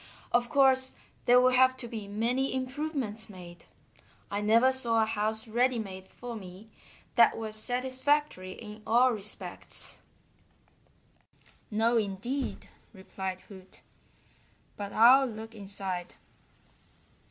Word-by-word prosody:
Of 240 0 +2
course, 265 -3 +4 0.3
there 245 +1 +6
will 255 0 +4
have 260 0 +4
to 245 - -5
be 220 -3 -7
many 240 +6 -1
improvements 260 -5 -3
made. 175 -3 -12 0.7
I 200 +1 -2
never 230 +5 +4
saw 230 -4 +3
a - - +1
house 220 +1 -2
ready 245 +3 +1
made 190 -3 -7
for 245 +3 -8
me 195 +1 -11 0.4
that 235 -1 +5
was 220 -1 -5
satisfactory 255 -3 -1
in 210 0 -11
all 245 +3 +4
respects." 210 -2 -1 1.7
"No, 230 +2 +2
indeed," 225 +6 -3 0.3
replied 190 -1 -6
Hoot. 190 -2 -15 0.9
"But 205 -1 -6
I'll 260 +4 +6
look 225 -1 -8
inside." 195 -4 -3
225 Hz, 115 wpm, -29 LUFS, 205-255 Hz, 1.7 s, there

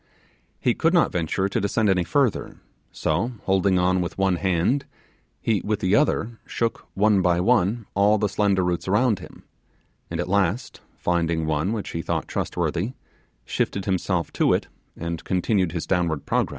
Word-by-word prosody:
He 125 - +2
could 165 +7 +2
not 170 - +4
venture 90 +3 0
to 100 - -1
descend 105 +2 +1
any 95 -3 +3
further; 135 +4 0 0.3
so 90 +11 -1
holding 95 0 +2
on 90 0 +2
with 85 - -4
one 95 -2 +2
hand, 95 +10 +1 0.5
he 110 -4 0
with 105 0 -1
the 95 -1 +1
other 120 -4 +1
shook 115 -1 -2
one 105 -1 +4
by 85 -1 +2
one 110 +2 +2
all 100 +2 +4
the 105 0 +1
slender 100 -2 +1
roots 90 0 -1
around 105 +1 +2
him, - - -13 0.7
and 85 - -4
at 90 - -1
last, 100 +4 0 0.2
finding 85 -2 0
one 80 +5 0
which 110 -3 -3
he 85 - -3
thought - - -2
trustworthy, 105 +9 -2 0.5
shifted 100 -1 -2
him 95 -2 +1
self 90 -3 -2
to - - +3
it - - 0 0.3
and 85 0 -4
continued 95 -1 +1
his 85 -2 -3
downward 85 -5 0
progress. - - +1
95 Hz, 170 wpm, -24 LUFS, 90-105 Hz, 0.7 s, not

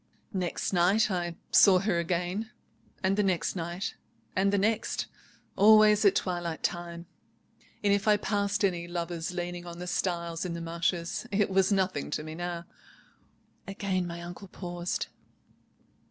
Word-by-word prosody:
"Next 185 0 -2
night 190 +5 +4
I 175 -2 -2 0.2
saw 190 -2 +7
her 190 -2 +1
again; 180 +5 -1 0.5
and 190 +1 +3
the - - +4
next 190 -3 0
night 175 +2 -3 0.4
and 195 +2 +3
the 200 - +2
next. 215 +3 0 0.5
Always 215 +1 +7
at 200 - +6
twilight 175 -3 -2
time; 175 -1 -3 0.8
and 200 -1 +4
if 200 +1 0
I 210 -1 +6
passed 205 0 0
any 175 -3 -1
lovers 170 0 -3
leaning 175 0 -4
on 170 0 -7
the 180 - -6
stiles 170 -2 -2
in 180 -2 -3
the - - -4
marshes 170 +4 -2
it 200 -1 +1
was 190 +1 +3
nothing 185 -6 0
to 150 - -2
me 155 0 -7
now." 175 0 -4 1.0
Again 195 -2 -1
my 170 0 -6
uncle 175 +3 -8
paused. 175 -1 -3
180 Hz, 150 wpm, -29 LUFS, 170-200 Hz, 1.0 s, saw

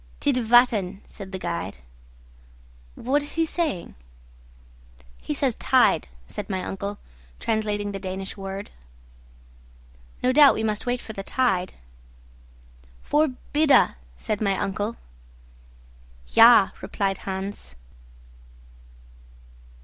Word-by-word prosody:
"Tidvatten," 240 -7 +3
said 195 -2 -10
the 190 - -4
guide. 85 - -4 1.2
"What 275 +5 0
is 290 +1 -6
he 325 0 +2
saying?" 315 - -2 1.3
"He 60 - -4
says - - +1
tide," - - +3 0.2
said - - -7
my 190 -2 -2
uncle, 200 +2 -5 0.4
translating 210 -2 -1
the 195 - -5
Danish 190 0 -5
word. 195 0 -7 1.5
"No 250 - +3
doubt 285 +1 +7
we 220 - -2
must 215 +2 -2
wait 245 0 0
for 220 - -8
the 195 - -5
tide." 195 -5 0 1.3
"Förbida," 290 -1 +3 0.2
said 210 - -3
my 195 -2 +1
uncle. 205 +3 -2 1.3
"Ja," 60 - +7
replied 195 -1 -2
Hans. 190 - -6
205 Hz, 100 wpm, -24 LUFS, 195-250 Hz, 1.5 s, doubt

